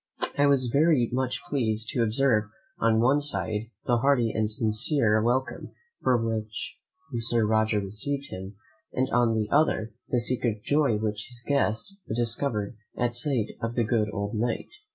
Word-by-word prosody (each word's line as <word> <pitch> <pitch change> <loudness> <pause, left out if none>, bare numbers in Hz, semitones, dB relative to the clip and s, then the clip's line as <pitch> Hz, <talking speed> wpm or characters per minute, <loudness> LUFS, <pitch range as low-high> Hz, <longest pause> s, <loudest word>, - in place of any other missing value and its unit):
I 145 0 +4
was 140 -2 +4
very 140 -1 +3
much 130 0 -1
pleased 110 -5 +2
to 120 - 0
observe 115 -1 +3 0.3
on 115 -1 +3
one 135 +5 +3
side 110 -6 -2 0.2
the 120 - +2
hearty 120 -2 +2
and 110 -1 0
sincere 110 0 +1
welcome 120 +2 -1 0.3
with 125 -2 +3
which 110 -1 -4 0.4
Sir 115 -1 +2
Roger 110 0 +2
received 135 +8 -3
him, 95 +2 -7 0.4
and 130 +1 -1
on 120 -2 +3
the 110 -1 0
other, 140 -7 +2 0.2
the 125 - +2
secret 120 -3 -1
joy 145 -7 +2
which 105 -1 -3
his 120 -1 -8
guest 140 - 0 0.2
discover'd 115 -2 -1 0.2
at 120 -1 0
sight 125 -3 +1
of 115 0 -3
the 120 - +2
good 110 -1 +1
old 100 0 -3
Knight. 115 +1 -2
115 Hz, 155 wpm, -27 LUFS, 110-130 Hz, 0.4 s, I